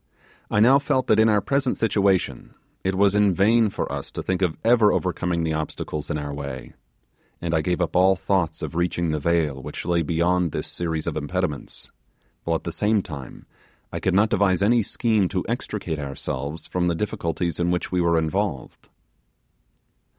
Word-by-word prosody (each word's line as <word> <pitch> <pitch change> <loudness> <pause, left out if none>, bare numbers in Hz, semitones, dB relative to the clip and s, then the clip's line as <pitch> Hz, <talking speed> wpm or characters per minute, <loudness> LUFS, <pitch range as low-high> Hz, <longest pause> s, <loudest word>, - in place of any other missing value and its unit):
I 105 - +1
now 130 +6 +6
felt 130 -2 0
that - - +3
in 110 0 +5
our 105 -1 +3
present 135 +3 0
situation 100 -4 0 0.3
it 95 0 0
was 100 +1 +4
in 105 -3 +3
vain 110 +3 +4
for - - -4
us - - -5
to - - -4
think 95 0 -1
of 90 -4 0
ever 115 -2 +5
overcoming 90 -2 -1
the 80 -1 0
obstacles 75 -1 -4
in 75 - -1
our 75 -1 -4
way, 70 -3 -7 0.7
and 85 -1 -3
I 80 - +2
gave 90 +3 -1
up 85 -1 -1
all 95 +1 +5
thoughts 90 -4 -1
of - - -4
reaching 85 -1 0
the 75 - -1
vale 75 -3 0
which - - -7
lay 85 -1 +2
beyond 85 +1 +1
this - - -3
series 80 -3 -3
of - - -3
impediments; 80 0 -3 0.5
while - - +1
at - - -3
the - - -4
same 105 -1 +1
time 70 -7 -9 0.5
I - - -2
could 95 - 0
not 105 +3 +4
devise 95 -2 +2
any 115 +3 +4
scheme 110 -2 +1
to 90 0 -2
extricate 105 - -3
ourselves 70 +2 -5
from 90 -1 -1
the 85 - +1
difficulties 85 -3 -2
in 85 0 +1
which 90 0 -1
we 90 -1 +1
were 85 -1 +3
involved. 80 -2 -2
90 Hz, 185 wpm, -24 LUFS, 80-100 Hz, 0.7 s, now